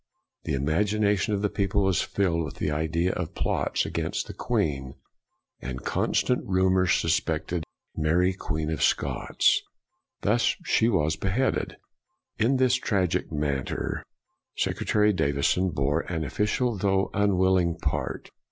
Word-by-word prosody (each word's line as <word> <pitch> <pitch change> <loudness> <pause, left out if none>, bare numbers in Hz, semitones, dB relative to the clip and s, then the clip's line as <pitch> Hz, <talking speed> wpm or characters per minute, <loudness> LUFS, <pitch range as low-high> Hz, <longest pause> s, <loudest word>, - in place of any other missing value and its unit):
The - - 0
imagination 105 - +1
of 100 - -3
the 105 - +2
people 100 0 0
was 95 -2 +2
filled 85 -4 0
with 75 - -6
the - - -2
idea 80 +4 0
of 90 -3 -4
plots - - 0
against 85 -1 -2
the - - -8
Queen, 70 -3 -2 0.7
and 65 +1 -6
constant 125 - +1
rumor 95 -1 +2
sus 85 -2 +3
pected 80 +2 -3 0.3
Mary 85 +4 +2
Queen 80 -3 -3
of 75 -3 -3
Scots. - - +2 0.6
Thus 115 +4 +2
she 115 - +3
was 80 -7 +1
beheaded. 100 +10 -1 0.6
In 125 +5 +3
this 130 -1 +3
tragic 95 -10 0
matter, 75 -3 -2 0.5
Sec - - -1
retary 105 -1 +2
Davison 70 +5 +1
bore 75 0 0
an 80 -2 -1
official, 105 - 0
though 95 0 +1
unwilling 95 -4 +2
part. 75 -5 -3
90 Hz, 135 wpm, -26 LUFS, 80-100 Hz, 0.7 s, sus